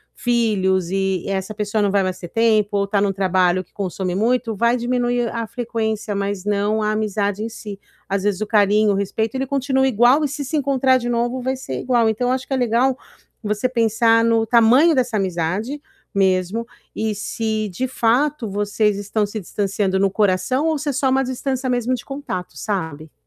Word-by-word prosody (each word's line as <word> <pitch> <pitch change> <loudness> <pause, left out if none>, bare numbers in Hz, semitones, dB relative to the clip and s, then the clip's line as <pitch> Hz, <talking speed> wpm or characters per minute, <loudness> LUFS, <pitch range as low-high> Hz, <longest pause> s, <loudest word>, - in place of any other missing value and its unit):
filhos 195 -7 +1
e 195 -2 -1
essa 195 +2 -3
pessoa 210 0 -1
não 200 - +2
vai 200 0 +3
mais 185 -1 -2
ter 175 - -8
tempo 220 -2 +2
ou 200 0 0
tá 200 0 +1
num 200 -1 +1
trabalho 185 -1 +2
que - - -35
consome 185 -2 -3
muito, 230 +1 0
vai 235 +4 +2
diminuir 245 0 0
a 230 -1 -3
frequência, 220 -3 -3
mas 200 -1 -2
não 210 +1 0
a 215 - +1
amizade 210 -1 -1
em 230 - -3
si. 205 -3 -8 0.3
Às 195 0 -1
vezes, 205 -1 0
o 215 - -1
carinho, 210 -1 +3
o - - 0
respeito, 220 +4 -2
ele 265 +1 -1
continua 265 0 +1
igual 250 +5 +4
e - - +2
se 285 +1 -5
se 310 +3 -2
encontrar 265 -2 +2
de 240 -1 -4
novo, 240 +2 0
vai 260 +1 -1
ser 130 - -5
igual. 240 -3 +2
Então, 245 +3 0
acho 260 0 -2
que - - -3
é 265 - +1
legal 250 +2 +2 0.5
você 210 +4 -1
pensar 230 -1 +3
no 230 -1 +3
tamanho 250 +8 +5
dessa 245 -4 +1
amizade 190 - -2 0.4
mesmo 190 +3 +1 0.3
e 220 -1 -1
se, 215 +1 -2
de 255 +8 -3
fato, 245 0 +1
vocês 205 +1 0
estão 205 +1 -1
se 205 +2 -6
distanciando 195 0 -1
no 195 0 +3
coração 205 +8 +1
ou 315 -2 +1
se 300 - -6
é 280 - -1
só 265 +1 +1
uma 265 +1 +2
distância 260 +1 -2
mesmo 245 0 0
de 245 - -4
contato, 275 -10 -6
sabe. 160 -7 -4
220 Hz, 195 wpm, -20 LUFS, 200-245 Hz, 0.5 s, tamanho